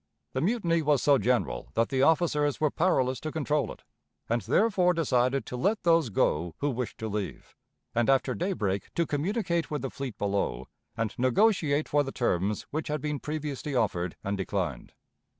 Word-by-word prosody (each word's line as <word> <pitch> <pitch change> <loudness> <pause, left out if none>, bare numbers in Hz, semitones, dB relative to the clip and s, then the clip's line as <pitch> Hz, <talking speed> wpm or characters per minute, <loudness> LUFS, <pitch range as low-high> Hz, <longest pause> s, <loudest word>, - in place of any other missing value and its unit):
The - - -1
mutiny 170 -4 +1
was 150 -3 +2
so 140 -2 +5
general 120 +3 0
that 115 0 +2
the 135 -2 +1
officers 150 -2 +2
were 155 -2 +2
powerless 130 -7 +1
to 155 - -4
control 150 -4 0
it, - - -12 0.4
and 115 +1 0
therefore 185 - +3
decided 130 -5 +1
to - - -6
let 200 - 0
those 165 -6 +4
go 85 -4 0
who 145 0 0
wished 125 -1 -4
to 110 - -4
leave, 105 -2 -5 0.4
and 120 +1 +1
after 135 -1 +3
daybreak 105 - -2
to 170 - +2
communicate 170 +2 -1
with 150 -4 -3
the 135 - -3
fleet 130 -6 -6
below 100 - -1 0.3
and 115 -2 -1
negotiate 150 - +3
for 145 - +3
the 135 -1 -3
terms 100 -4 0
which 155 +2 -3
had 150 0 -1
been 150 0 -3
previously 150 -1 -4
offered 90 -7 0
and 100 +1 -2
declined. 90 -9 -3
140 Hz, 175 wpm, -28 LUFS, 115-160 Hz, 0.4 s, so